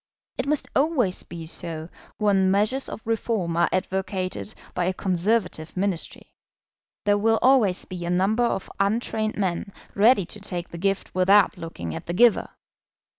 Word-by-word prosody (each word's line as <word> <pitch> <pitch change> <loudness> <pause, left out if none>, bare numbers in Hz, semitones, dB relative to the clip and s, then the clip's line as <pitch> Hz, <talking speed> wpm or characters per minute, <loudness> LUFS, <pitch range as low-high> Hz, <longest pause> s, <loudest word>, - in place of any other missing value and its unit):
It - - -1
must 300 0 +1
always 270 - +2
be 170 -1 -8
so 160 -1 -5 0.3
when 195 -3 +3
measures 210 +8 +1
of 220 - -8
Reform 220 -6 -1
are 170 0 +3
advocated 190 +1 -2 0.2
by 180 - 0
a 185 +1 0
Conservative 185 -3 -1
Ministry. 190 -3 -3 0.7
There 205 0 +3
will 225 +1 +3
always 235 -8 +4
be 180 -2 -7
a 170 - -3
number 195 +6 +2
of 195 - -2
untrained 215 +1 0
men 195 0 -1 0.2
ready 210 -1 +4
to 210 - -7
take 180 -4 -4
the 170 - -8
gift 195 +1 -1
without 195 +3 +4
looking 165 - -6
at 80 - -7
the 170 - -2
giver. 235 +4 +4
195 Hz, 155 wpm, -24 LUFS, 180-215 Hz, 0.7 s, always